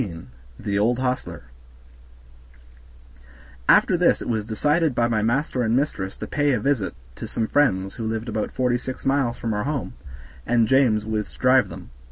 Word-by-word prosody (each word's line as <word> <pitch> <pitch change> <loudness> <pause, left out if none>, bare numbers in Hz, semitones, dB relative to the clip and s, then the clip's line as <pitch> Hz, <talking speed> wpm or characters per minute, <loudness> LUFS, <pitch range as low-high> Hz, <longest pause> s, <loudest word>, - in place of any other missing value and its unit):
15 85 - -7 0.3
The 100 -1 -2
Old 115 +4 +2
Hostler 125 - -3 2.3
After - - +5
this - - +3
it - - -7
was 110 -3 -2
decided 150 +6 +1
by 120 -1 +2
my 110 -2 0
master 125 +4 0
and 115 0 +1
mistress 115 -9 -2
to - - -5
pay 145 -1 +1
a 120 - +1
visit 115 -4 -1 0.2
to - - -6
some 115 - -2
friends 95 -8 +1
who 115 - -5
lived 110 +1 -3
about 110 -1 -2
forty 125 -1 0
six 130 +1 -7
miles 135 -3 +1
from 115 -2 -2
our 105 +2 -2
home, 140 -3 -3 0.5
and 115 -1 +2
James 115 -5 +3
was 110 -1 -3
to - - -18
drive 130 0 +4
them. - - -10
120 Hz, 180 wpm, -23 LUFS, 110-130 Hz, 2.3 s, After